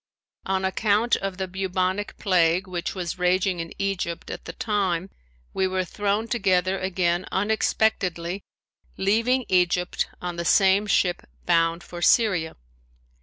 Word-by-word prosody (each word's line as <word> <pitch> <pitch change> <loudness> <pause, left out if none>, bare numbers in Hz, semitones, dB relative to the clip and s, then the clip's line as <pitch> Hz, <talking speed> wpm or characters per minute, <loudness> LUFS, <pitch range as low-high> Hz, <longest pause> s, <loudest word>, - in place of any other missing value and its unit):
On 190 0 0
account 210 +4 +2
of 195 -1 -4
the 190 -1 -3
bubonic 190 +1 -2
plague 180 -1 +2
which 175 0 -4
was 180 -1 -4
raging 180 0 +1
in 165 0 -5
Egypt 190 -4 -3
at - - -8
the 165 - -7
time 195 -3 -1 0.4
we 190 - +1
were 185 0 -1
thrown 205 +4 -1
together 190 -5 +1
again 180 -2 0
unexpectedly, 195 -3 0 0.6
leaving 230 +6 +2
Egypt 180 -1 +1
on 175 -1 -5
the 170 - -2
same 195 +4 +4
ship 180 -3 +2 0.2
bound 165 0 +2
for 175 0 -9
Syria. 185 -7 +3
185 Hz, 130 wpm, -24 LUFS, 175-200 Hz, 0.6 s, same